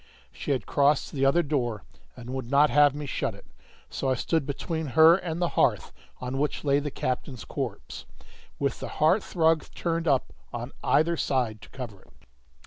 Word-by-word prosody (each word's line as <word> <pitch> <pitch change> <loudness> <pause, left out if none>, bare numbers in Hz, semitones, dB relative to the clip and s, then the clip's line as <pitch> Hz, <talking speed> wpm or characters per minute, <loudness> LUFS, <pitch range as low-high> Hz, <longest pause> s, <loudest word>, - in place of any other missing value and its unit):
She - - -8
had 135 -3 0
crossed 145 0 +2
to - - -11
the 135 0 +1
other 170 +6 +3
door, 120 -8 -2 0.3
and 125 0 -9
would 130 -2 -4
not 145 +2 +4
have 145 -1 +5
me 150 0 -5
shut 140 - -2
it. - - -16 0.4
So 135 - -3
I 130 - +2
stood 155 +3 -1
between 160 +2 -3
her 160 +5 +7
and 175 -3 -4
the 175 -1 +1
hearth, - - +1 0.3
on 130 +1 -4
which 150 +1 -1
lay 140 -1 +3
the 145 0 -3
captain's 130 -1 -4
corpse, - - -5 0.5
with 140 -1 -1
the - - -5
hearthrug 160 -1 +2
turned 165 -1 -1
up 135 -3 +1 0.2
on 120 +2 -5
either 170 +2 +3
side 120 -8 -1
to - - -13
cover 115 -8 -8
it. - - -24
140 Hz, 185 wpm, -27 LUFS, 130-160 Hz, 0.5 s, her